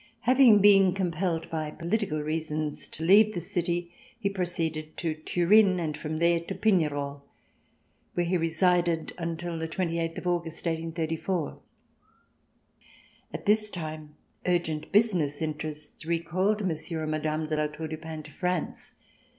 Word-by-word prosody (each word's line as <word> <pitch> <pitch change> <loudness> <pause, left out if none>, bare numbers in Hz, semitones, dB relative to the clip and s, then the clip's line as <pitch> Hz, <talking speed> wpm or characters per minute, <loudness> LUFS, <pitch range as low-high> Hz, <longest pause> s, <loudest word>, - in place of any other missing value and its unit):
Having 245 -4 +6
been 195 -2 +6
compelled 175 -2 -1
by 155 -2 -2
political 170 -1 -2
reasons 155 -1 -3
to 160 - -7
leave 205 +5 +6
this 175 0 -5
city, 175 0 -1 0.3
he 200 -4 0
proceeded 165 -5 -2
to 165 -2 -1
Turin 185 +5 +4
and 155 -3 -2
from 155 +1 -4
there 170 +1 +3
to 170 - -6
Pignerol, 145 -9 +1 0.9
where 175 - +1
he 180 +2 0
remained 170 0 +2
until 170 0 -3
the 160 - -2
twenty 170 0 -2
eighth 165 0 -2
of - - -6
August, 170 -2 -2
1834. 165 +1 -2 1.7
At - - -7
this 215 +1 +3
time 155 -4 -6 0.3
urgent 165 -4 0
business 180 -10 +3
interests 150 -1 -5
recalled 180 +6 0
Monsieur 160 -1 -2
and 155 - -2
Madame 155 0 -1
de 155 0 -2
La 150 0 +1
Tour 150 +2 -6
du 155 - -4
Pin 160 -1 -7
to 150 - -13
France. 180 +1 -2
165 Hz, 140 wpm, -28 LUFS, 155-180 Hz, 1.7 s, Having